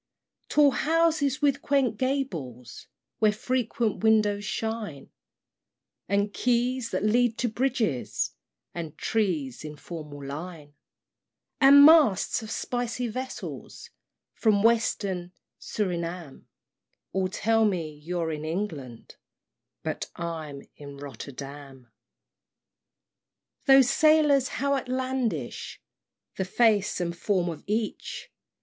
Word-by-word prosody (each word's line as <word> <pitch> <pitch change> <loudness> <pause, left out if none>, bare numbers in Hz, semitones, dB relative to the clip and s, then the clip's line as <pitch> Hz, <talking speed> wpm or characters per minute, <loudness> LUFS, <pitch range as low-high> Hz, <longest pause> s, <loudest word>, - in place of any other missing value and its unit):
III. - - -53
Tall 290 -2 +5
houses 310 -2 +1
with 280 -1 +2
quaint 270 -5 +1
gables, 170 - -4 0.3
Where 215 -1 +4
frequent 235 -1 -1
windows 210 -2 +3
shine, 215 -9 -4 1.0
And 200 +1 +1
quays 245 0 0
that 185 +1 -2
lead 230 +2 +2
to 245 - 0
bridges, 220 - -1 0.4
And 165 -3 -6
trees 165 - -1
in 150 -1 -7
formal 150 -3 -9
line, 150 +1 -7 0.9
And 285 +1 +9
masts 290 - +5
of 220 - -8
spicy 245 +1 -2
vessels 255 +3 -7 0.4
From 210 -3 +2
western 200 -6 +1 0.3
Surinam, 170 -6 -4 0.6
All 190 -1 0
tell 225 +3 +1
me 175 -7 0
you're 165 +2 -3
in 150 -1 -5
England, 155 - -5 0.7
But - - -4
I'm 160 -5 -5
in 140 -1 -10
Rotterdam. 140 -1 -9
IV. 120 -3 -41
Those 270 -2 +7
sailors, 300 -3 +4
how 280 +1 -1
outlandish 255 - -3 0.6
The 190 - -1
face 210 0 +2
and 170 -1 -2
form 180 0 0
of 160 -3 -7
each! 215 +1 -3
210 Hz, 105 wpm, -27 LUFS, 160-250 Hz, 1.0 s, And